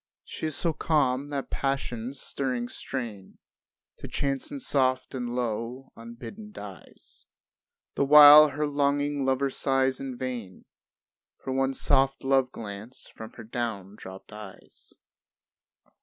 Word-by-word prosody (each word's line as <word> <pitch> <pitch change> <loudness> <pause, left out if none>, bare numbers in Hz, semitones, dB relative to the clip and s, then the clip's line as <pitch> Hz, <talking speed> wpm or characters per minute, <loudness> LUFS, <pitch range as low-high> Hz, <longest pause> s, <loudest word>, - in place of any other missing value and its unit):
She 160 - -5
is 155 - -4
so 165 -2 0
calm 145 -4 +1
that 140 -2 -4
Passion's 135 -2 -3
stirring 125 -3 -3
strain 115 -9 -6 0.6
To - - -8
chanson 140 - -2
soft 130 - 0
and 125 -2 -3
low 120 +2 -3
unbidden 120 - -10
dies; 100 - -12 0.7
The - - +1
while 150 +1 +10
her 150 +1 -2
longing 145 0 0
lover 135 +1 +1
sighs 135 -1 +1
in 135 -2 -6
vain 120 -8 -6 0.8
For 130 - -3
one 135 0 0
soft 135 0 +2
love 135 -1 +2
glance 105 +2 -8
from 110 0 -11
her 115 - -10
down 110 -4 -4
dropped 95 +1 -11
eyes. 105 -3 -12
130 Hz, 125 wpm, -27 LUFS, 115-140 Hz, 0.8 s, while